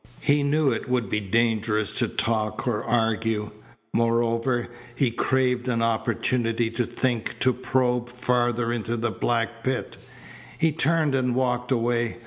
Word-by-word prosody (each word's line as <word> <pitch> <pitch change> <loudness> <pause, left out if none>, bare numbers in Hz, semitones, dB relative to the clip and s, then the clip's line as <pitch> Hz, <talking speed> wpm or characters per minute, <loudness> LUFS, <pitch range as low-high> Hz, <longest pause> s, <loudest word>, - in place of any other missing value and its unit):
He 145 +1 +3
knew 145 0 +2
it 115 - -3
would 120 -5 0
be 105 - +1
dangerous 110 0 +1
to 120 +2 -1
talk 110 +2 -1
or 105 -4 0
argue. 115 -2 0 0.4
Moreover, 115 +1 +1 0.3
he 130 -3 +2
craved 125 0 +1
an 115 -2 +1
opportunity 115 0 0
to 120 +1 -1
think, 120 -1 -1
to 130 - +4
probe 125 -1 0
farther 120 -1 0
into 120 0 -2
the 115 0 -1
black 115 0 -1
pit. 130 -1 -2 0.6
He 160 -1 +2
turned 155 -1 +1
and 125 -2 +1
walked 125 -1 0
away. 120 -1 0
120 Hz, 140 wpm, -25 LUFS, 115-125 Hz, 0.6 s, to